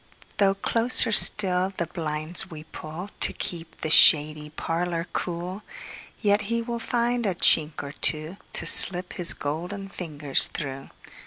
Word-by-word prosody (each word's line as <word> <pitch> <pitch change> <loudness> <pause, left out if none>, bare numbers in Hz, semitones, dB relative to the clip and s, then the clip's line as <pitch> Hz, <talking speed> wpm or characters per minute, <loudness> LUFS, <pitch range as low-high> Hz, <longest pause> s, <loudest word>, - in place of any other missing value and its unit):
Though 195 -1 +1
closer 230 +4 0
still 190 -3 +5
the 170 - -3
blinds 160 +1 -4
we 155 -3 -12
pullTo 160 +5 -4
keep 165 -2 -4
the 155 - -4
shady 150 -1 +4
parlour 165 +2 -5
cool, 180 +3 -6 0.6
Yet 205 -1 0
he 230 0 -3
will 235 0 -7
find 240 +1 -3
a 190 - -3
chink 155 -3 +2
or 140 - -9
twoTo 155 +5 -1
slip 180 -1 +5
his 175 -2 +2
golden 180 +7 -7
fingers 150 -7 -4
through. 135 -3 -9
175 Hz, 135 wpm, -23 LUFS, 155-195 Hz, 0.6 s, still